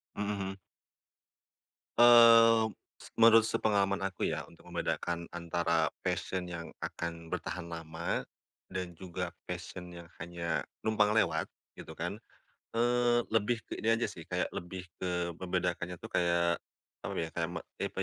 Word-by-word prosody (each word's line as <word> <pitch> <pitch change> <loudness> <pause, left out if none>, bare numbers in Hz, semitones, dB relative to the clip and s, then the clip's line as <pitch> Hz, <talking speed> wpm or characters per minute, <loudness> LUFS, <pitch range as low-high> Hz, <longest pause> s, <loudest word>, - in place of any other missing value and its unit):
Mhm 105 0 -2
mhm. 95 -1 -4 1.4
Eee, 115 -1 +9 0.4
se - - -12
menurut 115 0 +8
sepengalaman 100 -3 +1
aku 95 -2 -6
ya - - -1
untuk - - -16
membedakan 85 -1 -2
antara 85 -1 +1
passion 95 -1 -2
yang 85 -1 -6
akan 85 -1 -5
bertahan 85 +1 -4
lama 85 0 -3 0.5
dan 90 -2 -4
juga 90 +1 -5 0.2
passion 90 -1 -6
yang 85 -1 -10 0.2
hanya 85 -1 -2 0.2
numpang 105 -1 +3
lewat 85 -7 +2 0.2
gitu - - -10
kan. 85 +4 -2 0.6
Eee, 120 0 +3
lebih 115 +1 +1
ke - - -7
ini 115 +1 +3
aja 115 - -1
sih, 85 - -11
kayak - - -1
lebih 90 +1 -6 0.2
ke 90 -1 -1
membedakannya 90 -1 -1
tuh - - -11
kayak 85 -1 +2 0.4
apa - - -5
ya 80 - -1
kayak 80 +1 -1
me 85 0 -5
apa - - -49
ya, - - -1
90 Hz, 145 wpm, -32 LUFS, 85-110 Hz, 1.4 s, Eee